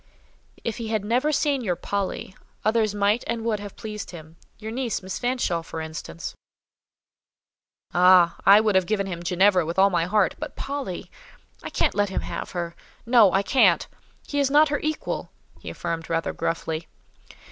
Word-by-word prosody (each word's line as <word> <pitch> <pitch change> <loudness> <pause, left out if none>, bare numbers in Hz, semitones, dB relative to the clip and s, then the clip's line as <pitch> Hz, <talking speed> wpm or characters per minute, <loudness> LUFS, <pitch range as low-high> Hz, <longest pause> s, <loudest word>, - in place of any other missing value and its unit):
"If 230 - -3
he 230 -2 -5
had 215 -2 -1
never 250 +7 +1
seen 285 -2 +1
your 180 -5 0
'Polly,' 195 0 -3 0.3
others 215 -1 +2
might 205 +3 +2
and 230 -1 -2
would 220 -3 0
have 205 -1 -8
pleased 210 -1 -7
him—your 170 +6 -11
niece, 240 -4 -2
Miss 190 0 -5
Fanshawe, 245 -9 0
for 165 0 -7
instance." 160 - -6 1.6
"Ah! 180 -1 +6
I 200 +2 +8
would 215 -2 +2
have 190 -2 +3
given 210 -2 0
him 175 -3 -5
Ginevra 180 +1 +3
with 165 +3 -4
all 195 +1 +5
my 170 -2 +1
heart; 205 +2 +2
but - - -6
Polly!—I 275 -10 -7
can't - - +1
let 205 -1 +1
him 190 - -2
have - - -5
her. 170 -1 -4 0.3
No—I 215 -5 +5
can't. 260 - +4 0.4
He 285 - -1
is 280 -1 +2
not 300 +2 +5
her 290 - 0
equal," 310 0 -3 0.3
he - - -8
affirmed, 165 0 -4
rather 165 0 -1
gruffly. 165 -1 -3
200 Hz, 165 wpm, -24 LUFS, 175-230 Hz, 1.6 s, I